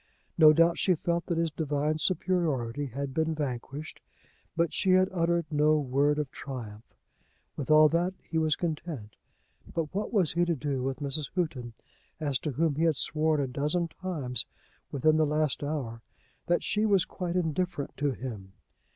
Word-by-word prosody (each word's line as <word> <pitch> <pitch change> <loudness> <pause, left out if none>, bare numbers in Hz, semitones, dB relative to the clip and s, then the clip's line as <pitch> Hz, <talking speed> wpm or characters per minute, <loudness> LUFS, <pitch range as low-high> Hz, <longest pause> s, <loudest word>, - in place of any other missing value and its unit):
No 155 -2 +8
doubt 165 +2 +4
she 185 - +3
felt 170 +2 -2
that 170 - -1
his 165 -1 +1
divine 150 0 -1
superiority 145 -8 0
had 135 +2 -5
been 160 +2 0
vanquished, 140 +1 -5 0.6
but 170 -2 +1
she 185 -1 +2
had 185 0 +5
uttered 170 -2 +1
no 150 +1 +4
word 145 +1 +1
of 150 -3 -2
triumph. 115 -5 -8 0.6
With 145 - -5
all 155 0 +8
that 175 +4 0
he 160 - -3
was 155 -2 +2
content. 155 - -4 0.6
But 165 -2 -3
what 205 +3 -2
was 195 -9 +3
he 175 +2 +2
to 175 -1 +1
do 140 -2 -2
with 135 +1 -3
Mrs. 145 +1 -1
Houghton, 130 -10 -2 0.5
as 145 -5 0
to 150 - -3
whom 160 +3 +1
he 160 - +1
had 160 -2 +3
sworn 155 +2 +1
a - - 0
dozen 150 +6 0
times 145 - -2 0.4
within 155 +3 +3
the 155 - +4
last 150 -2 0
hour 135 -6 -3 0.5
that 175 - +2
she 210 - +1
was 200 -4 +3
quite 180 -2 -4
indifferent 175 -3 -1
to 145 +1 +1
him. 110 -8 -6
155 Hz, 170 wpm, -29 LUFS, 140-170 Hz, 0.6 s, No